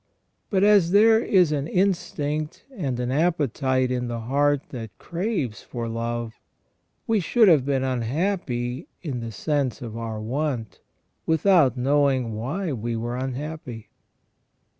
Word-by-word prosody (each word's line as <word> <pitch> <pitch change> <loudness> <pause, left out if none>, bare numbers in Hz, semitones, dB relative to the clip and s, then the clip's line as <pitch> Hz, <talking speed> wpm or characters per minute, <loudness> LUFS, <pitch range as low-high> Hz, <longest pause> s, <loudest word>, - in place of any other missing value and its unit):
But 195 -2 +2
as 205 -5 +5
there 220 +4 +6
is 185 -8 +3
an 145 -1 -1
instinct 155 -5 -1
and 135 - -2
an 125 0 -1
appetite 135 -5 +1
in 125 -1 -1
the 120 -1 -4
heart 140 +4 +1
that 115 -4 -6
craves 170 - -3
for 120 -2 -5
love, 115 0 -4 0.7
we 225 -2 +2
should 220 +5 +4
have 150 -7 +5
been 135 -2 +1
unhappy 130 - -2 0.2
in 140 -7 -3
the 115 -1 -5
sense 140 +1 -1
of 115 -3 -7
our 115 -1 -4
want, 125 0 -3 0.5
without 160 -5 +4
knowing 135 -2 +2
why 145 - -3
we 120 -1 -3
were 120 +2 -3
unhappy. 130 -3 -5
135 Hz, 135 wpm, -24 LUFS, 120-165 Hz, 0.7 s, there